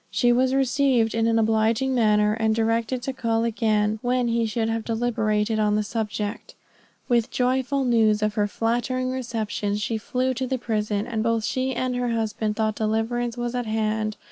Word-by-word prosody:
She 245 -1 +2
was 260 +2 +2
received 265 -4 +2
in 225 0 +1
an 230 0 +2
obliging 225 +4 +2
manner, 210 -3 +3
and 220 0 +1
directed 230 +2 0
to 270 - -3
call 230 -3 0
again 215 -2 +1
when 245 0 +1
he 230 -1 +1
should 220 +1 -1
have 225 0 -2
deliberated 220 -2 0
on 210 -1 +2
the 215 - +1
subject. 210 0 -4 0.5
With 235 -2 +3
the - - -15
joyful 260 +2 +1
news 220 -3 +3
of 215 0 +1
her 210 -1 +1
flattering 245 +4 -1
reception, 225 -5 -2
she 220 +1 -2
flew 255 +4 -1
to 260 +1 -3
the 260 - -1
prison, 215 -3 -1
and 230 -3 -2
both 230 0 0
she 260 +3 -1
and 255 0 -1
her 245 -1 -1
husband 220 -2 -1
thought 220 -1 0
deliverance 225 +3 -1
was 240 0 -3
at 245 -2 -2
hand. 215 0 -1
225 Hz, 185 wpm, -24 LUFS, 215-245 Hz, 0.5 s, manner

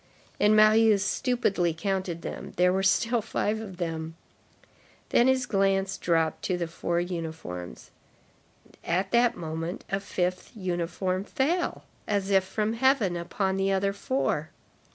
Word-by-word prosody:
And 210 +1 +5
Marius 215 -2 +5
stupidly 200 -10 0
counted 185 -1 -2
them; - - -6
there 180 0 +3
were 190 - +1
still 230 +5 +2
five 215 0 -1
of 195 -5 -8
them! 165 -2 -4 0.9
Then 240 - +4
his 260 -1 +2
glance 195 -2 +1
dropped 165 -4 0
to 185 - 0
the 175 - -1
four 170 +1 -2
uniforms. 160 - -6 0.9
At 185 +3 -1
that 240 0 +3
moment, 165 +2 -5
a 195 - +1
fifth 185 0 -3
uniform 185 0 -2
fell, 305 - -1 0.2
as 200 -1 0
if 190 -1 +5
from 210 +3 -1
heaven, 235 -6 +2
upon 190 +3 -1
the 195 0 +1
other 195 +1 +1
four. 260 +7 -1
195 Hz, 135 wpm, -27 LUFS, 175-215 Hz, 0.9 s, And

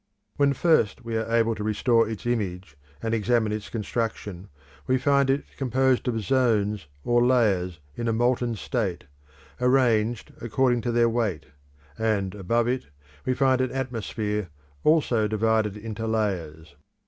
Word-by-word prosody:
When 140 -1 +3
first 140 - +2
we 115 -1 -3
are 110 +1 -2
able 115 0 +3
to 105 -1 -5
restore 115 +1 +2
its 110 -1 -6
image 95 -10 -2 0.3
and 115 0 -1
examine 115 0 +1
its 105 -1 -4
construction, 105 -4 -4 0.4
we 130 - +3
find 140 +1 +2
it 135 +2 +2
composed 130 -1 +1
of 115 -2 0
zones 105 - +1 0.2
or 120 0 +3
layers 100 -9 +2 0.2
in 120 - -3
a - - +2
molten 120 +1 +1
state, 105 -5 -2 0.6
arranged 120 -3 +2
according 120 +2 +1
to 120 +1 -1
their 120 0 +3
weight; 115 -8 -1 0.5
and 105 -4 0
above 115 +4 0
it 125 - -1 0.4
we 130 - +2
find 130 -1 +3
an 130 - 0
atmosphere 110 -6 -3 0.3
also 130 -9 +3
divided 110 -1 +1
into 110 +1 -5
layers. 85 -9 -2
115 Hz, 145 wpm, -25 LUFS, 105-125 Hz, 0.6 s, When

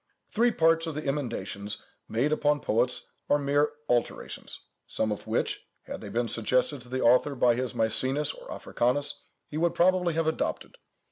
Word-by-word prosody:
Three 235 +2 +3
parts 165 -5 +3
of 160 - -4
the 155 - -4
emendations 115 -7 -3 0.3
made 135 +7 +1
upon 145 -1 +2
poets 120 +2 0 0.2
are 145 - +5
mere 145 +1 +2 0.2
alterations, 120 -1 -2 0.3
some 110 - -1
of 105 - -5
which, - - -1 0.2
had - - -7
they - - -7
been 120 +3 0
suggested 125 +5 +1
to 120 - -13
the 130 +1 -2
author 125 +4 +4
by 125 -1 +4
his 125 -1 -2
Mæcenas 130 +6 +2
or - - -11
Africanus, 130 +4 0 0.2
he 150 - -6
would 170 +1 +1
probably 180 -1 +3
have 165 0 +1
adopted. 160 - -2
140 Hz, 165 wpm, -28 LUFS, 120-155 Hz, 0.3 s, are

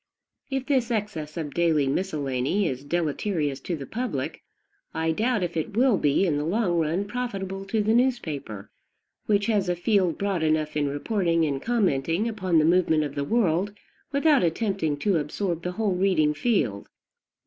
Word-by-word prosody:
If 270 -1 -2
this 260 -5 +1
excess 200 -10 -3
of 150 -3 -4
daily 165 -4 +2
miscellany 145 +2 0
is 130 -1 -4
deleterious 155 -1 -1
to 170 +5 -3
the 140 -3 -7
public, 220 - -4 0.5
I 160 0 +1
doubt 220 +3 0
if 170 -1 -3
it 165 +6 -3
will 250 -2 +4
be, 145 +6 +2
in 155 -5 +1
the 145 - -1
long 175 0 +1
run, 165 +5 0
profitable 195 -4 -4
to 210 +2 0
the 220 +2 +2
newspaper, 155 - -1 0.6
which 205 -1 +2
has 205 -4 +1
a 175 - +1
field 180 -1 +1
broad 200 -4 -1
enough 155 -1 0
in 145 -1 +1
reporting 165 +2 0
and 140 -3 -2
commenting 195 - +1
upon 190 -7 0
the 155 - +4
movement 165 -2 +3
of 145 -2 -4
the 140 - -2
world, 195 0 +1 0.4
without 285 0 +4
attempting 170 -3 0
to 185 +5 +1
absorb 165 +3 -2
the 180 +1 -4
whole 215 -1 0
reading 180 -5 +2
field. 145 - 0
175 Hz, 170 wpm, -25 LUFS, 150-210 Hz, 0.6 s, will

